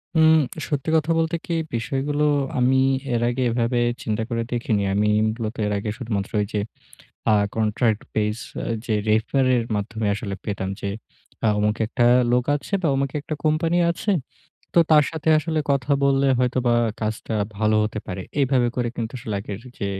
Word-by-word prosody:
উম 160 0 +6 0.4
সত্যি 145 0 -2
কথা 160 +1 +2
বলতে 165 +1 0
কি, 170 - -2 0.2
বিষয়গুলো 140 +5 -1 0.3
আমি 130 +2 +3 0.3
এর 120 - +1
আগে 125 +1 -1
এভাবে 120 +1 0 0.2
চিন্তা 110 0 -1
করে 115 -1 -1
দেখিনি। 110 -4 0
আমি 105 +1 +2 0.2
মূলত 110 +1 -4
এর 105 - -1
আগে 105 +2 -3
শুধুমাত্র 110 -6 -3
ঐযে 105 0 -2 0.7
আ - - +5 0.2
contract 110 0 +1
base 105 +1 -1 0.4
যে 110 - 0
refer 110 +5 +2
এর 120 - 0
মাধ্যমে 110 +1 -3
আসলে 100 -1 -4
পেতাম 100 -3 -3
যে, 100 - -3 0.6
আ - - +4
অমুকে 105 +1 0
একটা 120 +1 +1 0.3
লোক 125 0 +3
আছে 145 +7 -6
বা, 165 - +2
ওমুক 135 0 0
একটা 155 +1 -5
কোম্পানি 165 +3 +2
আছে। 170 +5 -2 0.6
তো - - +5
তার 150 -2 +7
সাথে 160 -1 -4
আসলে 155 +1 -2
কথা 140 0 0
বললে 140 0 +3
হয়তোবা 125 -1 +2 0.3
কাজটা 110 +1 -3 0.2
ভালো 110 +1 +2
হতে 105 0 -3
পারে। 95 0 -5 0.2
এভাবে 130 -3 +3
করে 120 -1 0
কিন্তু 115 +1 -3
আসলে 110 -2 -5
আগের 100 0 -6 0.2
যে 100 - -2
120 Hz, 170 wpm, -23 LUFS, 110-140 Hz, 0.7 s, তার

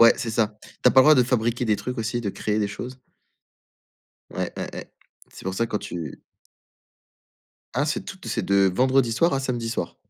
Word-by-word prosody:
Ouais 115 0 +9
c'est 115 - -3
ça, 110 -2 0
tu - - +1
as - - +4
pas 130 - +4
le - - +5
droit 155 0 +8
de 125 - +5
fabriquer 120 0 0
des 105 -2 +2
trucs 125 +4 -5
aussi, 115 +2 -1
de 105 - -3
créer 105 +2 -2
des 105 - +1
choses. 125 +5 -7 1.3
Ouais, - - -3
ouais, - - -4
ouais. - - -8 0.4
C'est - - -13
pour 95 0 -2
ça 115 - 0
quand 105 - -2
tu 85 -7 -6 1.5
Ah 145 +4 +1
c'est 155 - -2
toute 190 - -9
c'est - - -1
de 100 -1 +4
vendredi 130 0 +3
soir 165 +9 +2
à 135 - +1
samedi 120 -4 -2
soir. 115 -7 -3
115 Hz, 210 wpm, -24 LUFS, 105-130 Hz, 1.5 s, Ouais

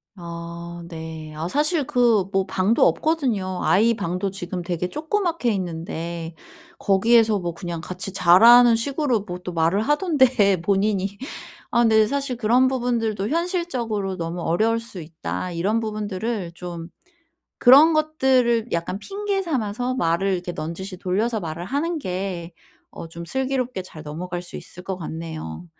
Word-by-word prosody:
아 170 -1 -8
네. 160 -2 -8
아 160 +2 -3
사실 300 - +1
그 240 -7 +3
뭐 195 -1 +1
방도 190 +4 +3
없거든요. 210 - 0
아이 225 +5 +4
방도 195 -1 -2
지금 180 -1 -5
되게 175 0 -3
조그맣게 325 - -1
있는데 170 -2 -5 0.4
거기에서 220 +2 +4
뭐 175 -2 -3
그냥 170 -1 -5
같이 185 +4 -5
자라는 230 +7 +7
식으로 265 -1 0
뭐 180 -3 -7
또 180 - -5
말을 165 +5 +2
하던데 260 - +3
본인이. 195 +1 0 0.5
아 235 - +3
근데 220 -2 +4
사실 275 0 -2
그런 245 +3 +3
부분들도 230 -5 -1
현실적으로 260 - -1
너무 170 0 -4
어려울 215 +8 +1
수 230 -6 -9
있다 155 - -5
이런 195 +7 0
부분들을 210 -3 -3
좀 175 -1 -7 0.7
그런 285 +6 +8
것들을 260 -7 +2
약간 170 +3 -2
핑계 400 - -2
삼아서 250 - -2
말을 175 0 +1
이렇게 180 -1 -3
넌지시 185 +4 -5
돌려서 210 +5 -1
말을 165 -1 -5
하는 305 - -1
게 180 - -4 0.4
어 - - -8
좀 170 +1 -9
슬기롭게 260 -3 -2
잘 165 -4 -11
넘어갈 175 +4 -5
수 175 - -9
있을 180 - -10
것 190 0 -4
같네요. 160 - -7
200 Hz, 300 characters per minute, -23 LUFS, 175-245 Hz, 0.7 s, 그런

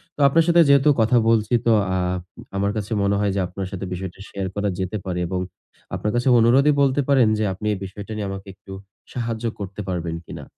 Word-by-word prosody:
তো - - -17
আপনার 165 +4 +4
সাথে 170 0 +6
যেহেতু 140 +1 +5
কথা 110 +2 +3
বলছি 110 0 +2
তো 115 - +4 0.3
আপ 90 0 -1 0.4
আমার 100 +1 +1
কাছে 105 +2 -5
মনে 100 0 +2
হয় 105 -1 +1
যে - - 0
আপনার 95 +1 -5
সাথে 95 0 -5
বিষয়টা 95 0 -6
শেয়ার 95 -1 -4
করা 100 0 0
যেতে 95 +3 -2
পারে 90 -1 -2
এবং 90 0 -2 0.6
আপনার 105 - -2
কাছে 120 +2 0
অনুরোধই 135 +6 +5
বলতে 140 +1 +3
পারেন 130 -5 +5
যে - - +1
আপনি 95 - -8
এই - - -3
বিষয়টা 100 +3 -9
নিয়ে 105 -2 -3
আমাকে 95 +1 -7
একটু 95 - -15 0.4
সাহায্য 115 -1 -3
করতে 100 +1 -6
পারবেন 85 -3 -3
কিনা? - - -8
105 Hz, 210 wpm, -22 LUFS, 95-120 Hz, 0.6 s, সাথে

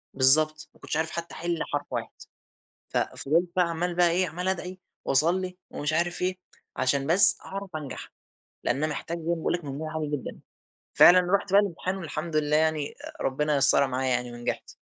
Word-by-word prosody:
بالضبط، 155 +4 +3
ما - - -22
كنتش - - -3
عارف 160 0 -1
حتى 170 0 -5
أحل 170 0 -2
حرف 145 0 -1
واحد، - - -4 0.8
ف - - -2
فِضِلت 165 +5 0
بقى 180 -2 +2
عَمَّال 175 +1 -2
بقى 175 -1 +4
إيه 180 +2 +1
عَمَّال 180 +4 -4
أدعي 185 0 -3 0.3
واصلي 180 +6 +1
ومش 150 +1 -2
عارف 170 +1 0
إيه، 185 0 0 0.4
عشان 135 +1 +1
بس 175 +5 +6
أعرف 195 0 -6
أنجح، 150 -4 -7 0.5
لأن 120 - +1
أنا 155 +2 0
محتاج 165 +2 -4
زي - - -10
باقول 165 - -1
لك 175 -3 -3
مجموع 150 +3 -5
عالي 150 -2 -2
جدًا، 135 - -8 0.5
فعلًا 180 +1 +8 0.2
رُحت 200 -1 -3
بقى 200 +1 +7
الامتحان 185 -1 -3
والحمد 165 -2 -5
لله 150 0 +2
يعني 155 -2 0 0.3
ربنا 150 +3 0
يسَّرها 140 0 +4
معايا 130 0 -1
يعني 125 -1 -1
ونجحت. 120 0 -4
160 Hz, 180 wpm, -26 LUFS, 145-180 Hz, 0.8 s, فعلًا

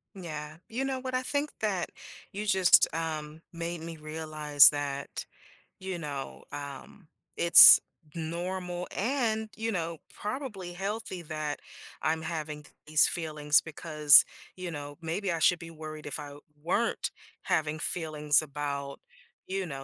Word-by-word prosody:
Yeah. 155 -4 -7
You 245 +4 -2
know 265 -1 -2
what, 255 0 -5
I 255 - +1
think 285 +3 -1
that 195 -5 -1 0.4
you 205 +2 -5
just, 190 -3 +6
um, 155 -1 -4
made 170 0 -4
me 165 0 -7
realize 155 -1 +4
that, 140 -1 -4 0.5
you 190 -1 -4
know, 145 -4 -6
um, 145 +5 -9 0.3
it's 170 0 +10 0.4
normal 175 +2 -4
and, 220 -1 0
you 225 +1 -2
know, 170 -4 -3 0.2
probably 210 -6 -5
healthy 195 0 -4
that 155 -2 -4 0.4
I'm 160 +1 0
having 155 -2 -5
th - - -19
these 155 0 +5
feelings 150 -3 +1
because, 150 -2 +5 0.3
you 185 -2 -6
know, 145 -2 -7
maybe 175 +4 -2
I 165 - -2
should 175 +2 +4
be 165 -1 -9
worried 155 -1 -9
if 145 - -4
I 145 -1 -8 0.3
weren't 205 +9 0 0.3
having 155 0 0
feelings 150 -3 +1
about, 140 -2 -5 0.5
you 190 0 -2
know, 135 -5 -7
160 Hz, 140 wpm, -29 LUFS, 150-185 Hz, 0.5 s, it's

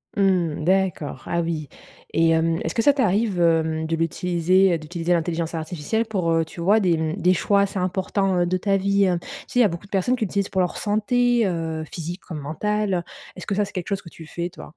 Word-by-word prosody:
Mmh. 180 -6 +1
D'accord, 185 -4 0
ah 170 0 0
oui 160 -3 -3 0.5
et 165 0 +4
hem, 165 0 +2
est-ce 160 - -2
que 230 - +1
ça 285 +4 +5
t'arrive, 210 -6 +1
hem, 160 -1 +2
de 165 +1 -1
l'utiliser 175 +2 +2
d'utiliser 165 +2 -4
l'intelligence 170 -1 0
artificielle 165 +7 -2
pour, 185 -7 -1
heu, 165 0 +2
tu 170 - -9
vois, 205 +6 +4
des 180 -4 +2
mmh, 160 0 -1
des 180 +2 +4
choix 200 +3 +2
assez 200 0 -1
importants, 190 +1 0
heu, 175 - +3
de 180 - 0
ta 195 +2 +1
vie? 200 0 +2
Tu - - -15 0.2
sais, 250 - -1
il - - +7
y 235 - +6
a - - +5
beaucoup 170 +2 -6
de - - -18
personnes 200 +6 +1
qui 235 - -2
l'utilisent 200 0 -1
pour 190 - +1
leur 180 - -1
santé, 240 +2 +2
heu, 165 -3 -2
physique 175 +3 -6
comme 160 -4 -7
mentale. 190 +5 -1 0.3
Est 185 - -9
ce - - -9
que 200 - -1
ça, 205 0 +1
c'est 205 - -12
quelque 185 -3 -4
chose 200 -1 -1
que 170 - -15
tu 165 - -12
fais, 170 +2 -4
toi? 165 - -12
180 Hz, 235 wpm, -23 LUFS, 165-200 Hz, 0.5 s, il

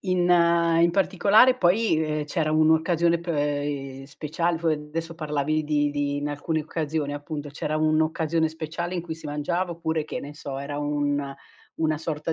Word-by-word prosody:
in 185 -2 +1 0.5
in 170 - +5
particolare 200 +6 +4
poi, 200 0 +3
ehm, 155 -1 -2
c'era 155 +1 -1
un'occasione 160 +2 +3
p 170 - -11
ehm, 145 -3 -2
speciale, 160 +4 -2
f 170 - -13
adesso 160 +1 -2
parlavi 155 -1 -1
di 150 -1 +1
di 145 0 -1
in 145 0 -2
alcune 150 +2 -2
occasioni 155 -2 -3
appunto, 145 0 -6
c'era 150 +1 -3
un'occasione 160 +1 +1
speciale 165 +3 -5
in 175 - -2
cui 165 -1 -5
si 160 -1 -10
mangiava 150 +5 -2
oppure, 160 -2 -2
che - - -5
ne 145 +1 -8
so, 140 -3 -6
era 140 +1 -5
un 145 -1 -1 0.4
una 155 -1 0
sorta 160 0 -3
155 Hz, 165 wpm, -25 LUFS, 145-165 Hz, 0.5 s, in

